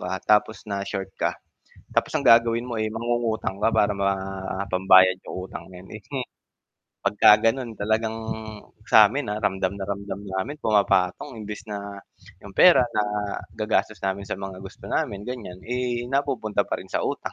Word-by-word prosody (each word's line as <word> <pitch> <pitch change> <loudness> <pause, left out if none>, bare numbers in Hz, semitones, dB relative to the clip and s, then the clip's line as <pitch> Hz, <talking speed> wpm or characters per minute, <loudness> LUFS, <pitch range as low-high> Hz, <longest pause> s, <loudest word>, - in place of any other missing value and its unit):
ka 95 - -3
tapos 105 +2 +2
na 100 -2 -3
short 95 -1 -4
ka - - 0 0.6
tapos - - +1
ang - - -4
gagawin 115 0 +5
mo, 120 - -4
eh, 110 - 0
mangungutang 115 -3 -2
ka 110 - +4
para 105 -2 +2
ma 100 0 +1 0.5
pambayad 95 0 +5
ng - - -8
utang 95 -2 -7
ngayon. 90 +1 -12
Eh, 105 - -8 1.0
'pagka 105 +1 +5
ganon 120 0 -2
talagang 110 +2 0 0.7
samin, 110 +3 +4
ah, 105 - -3
ramdam 95 -3 0
na 100 -1 -6
ramdam 100 0 -4
namin 100 +9 -4
pumapatong 100 -3 +1
imbis 105 0 -7
na 100 -1 -6 0.5
yung 100 - -10
pera 170 - +7
nagagastos 105 +1 -1
namin 95 +1 -2
sa - - -3
mga 95 -1 -7
gusto 95 - -12
namin, 105 -10 -2
ganyan, 120 -8 -6
eh, 120 0 -2
napupunta 135 -6 0
pa - - -1
rin - - -11
sa - - +1
utang. - - -3
105 Hz, 160 wpm, -24 LUFS, 95-115 Hz, 1.0 s, pera